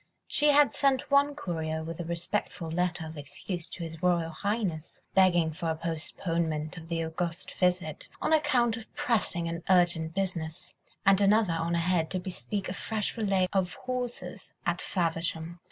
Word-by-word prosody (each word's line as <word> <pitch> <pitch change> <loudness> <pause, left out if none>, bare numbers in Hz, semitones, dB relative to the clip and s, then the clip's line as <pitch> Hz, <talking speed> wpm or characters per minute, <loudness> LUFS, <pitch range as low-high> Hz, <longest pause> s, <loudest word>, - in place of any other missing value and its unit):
She 300 - +2
had 290 -1 +6
sent 275 -1 +2
one 280 +1 +4
courier 160 - -2
with 165 +1 -6
a - - -1
respectful 170 0 -3
letter 175 -1 0
of 155 -1 -7
excuse 165 +5 -5
to 175 - -5
His 165 -1 -6
Royal 170 -2 +2
Highness, 190 -3 -2
begging 175 -4 +5
for 165 +1 -3
a 160 - +1
postponement 160 -1 -2
of 165 -2 -9
the 165 -1 0
august 165 +1 -3
visit 180 -4 0
on - - +1
account 250 -7 +3
of 225 - -10
pressing 230 -12 0
and 165 0 -3
urgent 175 -3 +3
business, 175 -4 -3 0.3
and 195 +1 +6
another 205 -2 +4
on 165 +1 0
ahead 170 -1 +1
to 185 - -1
bespeak 190 +2 -4
a - - -3
fresh 215 0 -2
relay 195 -5 +2
of 180 -3 +1
horses 250 -1 -4
at - - 0
Faversham. 165 -1 -2
175 Hz, 165 wpm, -29 LUFS, 165-200 Hz, 0.3 s, had